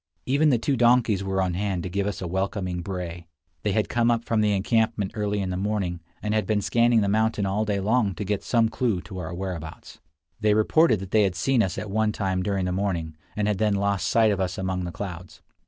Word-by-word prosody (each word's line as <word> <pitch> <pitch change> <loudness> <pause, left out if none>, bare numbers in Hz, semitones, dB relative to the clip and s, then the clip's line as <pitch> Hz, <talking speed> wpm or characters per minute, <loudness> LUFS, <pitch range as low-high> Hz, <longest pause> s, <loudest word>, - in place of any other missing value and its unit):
Even 145 +4 +3
the 125 - +4
two 135 +4 0
donkeys 120 -4 +3
were 95 0 0
on 90 -1 -1
hand 95 -1 -2
to - - -3
give 100 +2 -1
us 100 - -4
a - - -3
welcoming 95 0 -2
bray. 85 -2 -6 0.3
They 105 - 0
had 110 0 +1
come 120 0 +1
up 115 -1 +1
from 115 -2 +1
the 105 -1 +2
encampment 105 0 +1
early 105 -1 -1
in 95 - -3
the 90 - -2
morning, 95 -3 -1 0.2
and 105 0 -1
had 110 0 0
been 110 -2 +2
scanning 115 +2 +3
the 100 - +1
mountain 110 0 +1
all 100 +3 0
day 105 -2 0
long 105 -1 +1
to 105 - -4
get 100 0 -1
some 115 -2 +2
clue 110 -5 -1
to 95 -1 -8
our 90 0 -5
whereabouts. 85 -3 -6 0.4
They 105 -1 +3
reported 110 - +3
that 95 0 -8
they 110 - +4
had 95 -3 +1
seen 125 +8 +2
us 95 -4 -1
at 105 - -5
one 110 +1 +1
time 95 -3 -1
during 95 0 -1
the 90 - -1
morning, 90 -5 -2 0.2
and 105 -1 0
had 105 -3 0
then 105 -2 +2
lost 100 -1 0
sight 110 -2 +4
of 100 - -1
us 90 -2 -2
among 95 -1 -2
the 85 - -4
clouds. 90 -2 -8
100 Hz, 240 wpm, -25 LUFS, 95-110 Hz, 0.4 s, the